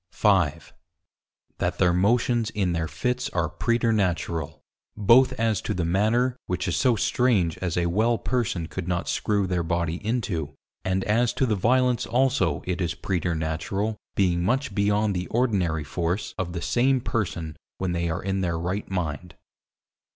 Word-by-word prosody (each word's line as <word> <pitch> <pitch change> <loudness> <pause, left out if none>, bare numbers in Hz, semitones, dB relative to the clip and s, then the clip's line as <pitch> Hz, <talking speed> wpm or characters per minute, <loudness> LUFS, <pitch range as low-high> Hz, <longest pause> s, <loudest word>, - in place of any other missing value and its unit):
5. 95 -8 +1 0.9
That - - -1
their 90 -1 +3
Motions 115 +4 +2
in 95 -5 -1
their 80 -1 -1
Fits 125 +8 -2
are 85 -3 +1
Preternatural, 90 - 0 0.4
both 115 +5 +5
as 110 -1 0
to - - -3
the 90 -2 -1
manner, 110 +8 +2
which 90 +1 -2
is 90 - 0
so 120 - +3
strange 105 -7 +2
as 90 -2 -2
a 85 - +2
well 110 +7 +2
person 110 -11 -1
could 90 +1 -6
not 90 -1 -1
Screw 100 -2 0
their 90 -2 0
Body 85 +1 -2
into; 95 - -2 0.3
and 95 0 0
as 120 +3 +2
to 130 - +1
the 110 -4 +1
violence 125 +4 +2
also 125 - +1
it 90 0 -2
is 85 -3 -1
preternatural 90 +4 -2 0.2
being 90 -3 +2
much 125 +3 0
beyond 105 0 +1
the 90 0 -2
Ordinary 95 -10 0
force 85 +5 -2
of 85 -2 -3
the 85 - -4
same 130 +2 +2
person 90 -10 -3 0.2
when 95 -2 -2
they 85 -1 -1
are 85 +3 -3
in 95 0 -1
their 85 -3 -1
right 90 +5 -3
mind. 90 -2 -3
95 Hz, 160 wpm, -25 LUFS, 85-115 Hz, 0.9 s, both